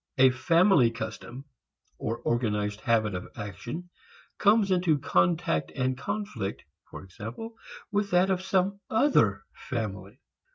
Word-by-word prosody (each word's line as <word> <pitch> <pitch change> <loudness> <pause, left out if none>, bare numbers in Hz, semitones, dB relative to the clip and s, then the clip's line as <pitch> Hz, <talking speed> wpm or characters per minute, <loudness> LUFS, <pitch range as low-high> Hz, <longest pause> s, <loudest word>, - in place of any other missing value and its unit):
A 130 0 +7
family 165 - +4
custom 115 +4 -7 0.5
or 115 - -2
organized 105 -3 -1
habit 110 -3 +1
of 90 0 -5
action 120 - -7 0.5
comes 205 -1 +4
into 175 -4 +3
contact 90 - +1
and 130 -1 0
conflict 140 - -4 0.3
for - - -9
example 115 - -8 0.4
with 205 0 0
that 180 +1 +3
of 185 -1 0
some 190 +1 0
other 220 - +3
family. 105 -8 -5
130 Hz, 120 wpm, -28 LUFS, -, 0.5 s, A